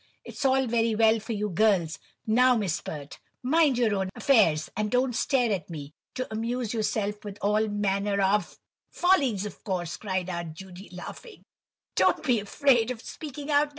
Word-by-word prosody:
It's - - -6
all 265 0 +3
very 230 -1 +1
well 220 0 +4
for 225 +2 -5
you 210 0 -2
girls—now, 215 +6 +2
Miss 195 -7 -1
Pert, 145 -2 -8 0.2
mind 290 0 +3
your 230 -4 +2
own 190 -1 -1
affairs, 170 - +3
and 210 +1 -1
don't 250 +2 +1
stare 245 -3 +1
at 185 -5 -2
me!—to 160 - -7
amuse 230 +1 -2
yourself 210 -2 -2
with 205 -1 -7
all 210 +2 +1
manner 200 -1 0
of—" 200 +2 +1 0.3
"Follies, 275 - +2
of 210 - -9
course," 180 -5 -3
cried 185 -3 -2
Aunt 170 -3 -5
Judy, 190 +2 -11
laughing, 180 - -10 0.5
"don't - - +3
be 250 -6 +2
afraid 240 +3 +2
of 250 -3 -4
speaking 290 +3 -7
out, 290 +1 +5
No. - - -14
215 Hz, 165 wpm, -27 LUFS, 195-250 Hz, 0.5 s, out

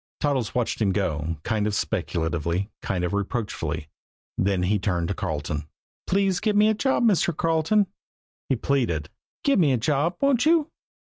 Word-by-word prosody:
Toddles 135 -7 0
watched 120 -2 -1
him 100 -3 +2
go 80 -5 -1
kind 105 -1 0
of 105 - -1
speculatively, 85 -1 -1
kind 90 -2 -2
of 90 - -1
reproachfully. 100 -6 -2 0.5
Then 95 -1 +1
he 100 +3 +2
turned 90 -4 -1
to - - 0
Carleton. 75 -2 -3 0.4
"Please 195 -1 +2
give 210 -1 0
me 210 +1 +5
a - - +3
job, 265 +4 +1
Mr. 180 -7 +3
Carleton," 165 +5 +2 0.6
he 135 - +3
pleaded. 115 - 0 0.3
"Give 280 -6 +3
me 150 -6 +4
a - - +2
job, 150 +8 +1
won't 275 -4 +3
you?" 320 0 +3
115 Hz, 165 wpm, -25 LUFS, -, 0.6 s, me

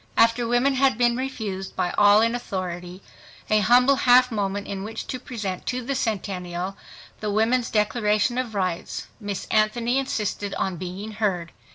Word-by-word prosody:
After 230 +1 +4
women 245 +4 +2
had 265 -3 +2
been 240 -1 +3
refused 220 -7 -4
by 175 - 0
all 205 +1 +6
in 230 +1 +2
authority 185 -5 -5 0.5
a 215 - +5
humble 250 +6 +5
half 250 0 +5
moment 200 -2 -2
in 195 -1 -5
which 220 +2 -6
to 255 - -5
present 210 -7 -5
to 255 0 -2
the 275 +4 -2
Centennial 190 -6 -3 0.4
the 215 - -3
Women's 225 +4 +1
Declaration 215 +2 +1
of 235 -4 -4
Rights, 185 -3 -2
Miss 205 -3 -4
Anthony 230 +4 +2
insisted 210 -6 -2
on 190 -2 -2
being 185 +5 -6
heard. 195 -6 -1
215 Hz, 160 wpm, -24 LUFS, 195-245 Hz, 0.5 s, all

